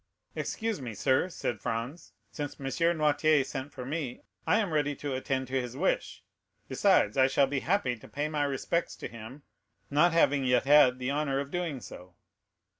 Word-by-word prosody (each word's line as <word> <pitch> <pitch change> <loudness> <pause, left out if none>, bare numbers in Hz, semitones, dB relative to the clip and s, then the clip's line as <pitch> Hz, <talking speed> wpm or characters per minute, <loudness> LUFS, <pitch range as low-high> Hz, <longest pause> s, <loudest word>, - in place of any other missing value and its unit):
"Excuse 225 - -3
me, 120 -4 -6
sir," 130 - +2
said 145 - -4
Franz, 125 +7 -4 0.2
"since 145 -2 -6
M. 135 - -7 0.3
Noirtier 150 -1 +3
sent 135 +2 -6
for 125 - -8
me, 140 -3 -4 0.2
I - - +4
am 205 -7 -1
ready 145 -1 +1
to 145 -1 -4
attend 130 0 -2
to 130 0 0
his 125 +1 -7
wish; 185 +6 -1 0.4
besides, 185 - +3
I 130 0 +6
shall 135 +1 +3
be 135 0 -2
happy 155 -7 0
to 110 - -14
pay 145 +1 -2
my 150 -1 -1
respects 140 +5 -1
to - - -6
him, 115 +5 -11 0.5
not 150 +5 +4
having 145 -4 +3
yet 125 -1 +3
had 135 -2 +6
the 130 +1 -2
honor 140 -2 0
of 140 0 -5
doing 170 -7 -3
so." 90 -4 -11
140 Hz, 185 wpm, -29 LUFS, 130-155 Hz, 0.5 s, I